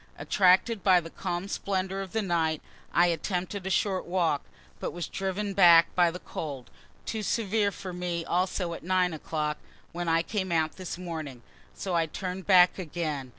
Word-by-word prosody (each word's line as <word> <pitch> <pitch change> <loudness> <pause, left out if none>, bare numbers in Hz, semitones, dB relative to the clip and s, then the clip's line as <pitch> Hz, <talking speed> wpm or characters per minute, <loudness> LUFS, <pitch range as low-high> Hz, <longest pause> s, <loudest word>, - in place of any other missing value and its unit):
Attracted 190 +3 +3
by 185 -3 +6
the 165 -1 -9
calm 175 0 -3
splendor 195 -1 -2
of 190 -2 -7
the 220 -1 -1
night, 165 -4 0 0.3
I 175 - +5
attempted 180 +3 -2
a - - -1
short 190 -1 +1
walk, 170 -5 +1 0.4
but - - -4
was 175 0 -4
driven 195 +1 -3
back 170 -4 +7
by 175 -1 +4
the 170 - -6
cold. 140 -7 -7 0.3
Too 220 - -3
severe 210 -1 +1
for 190 -2 -7
me 175 -1 -3
also 180 -1 0
at - - -7
9 180 0 +1
o'clock, 150 -1 -3 0.3
when 175 0 -4
I 165 0 +3
came 190 -1 -3
out 160 -1 0
this 185 -2 -5
morning, 160 -9 -6 0.3
so 190 - -4
I 165 -1 +2
turn'd 185 +3 -5
back 180 -1 +6
again. 155 -6 -3
180 Hz, 175 wpm, -28 LUFS, 165-190 Hz, 0.4 s, back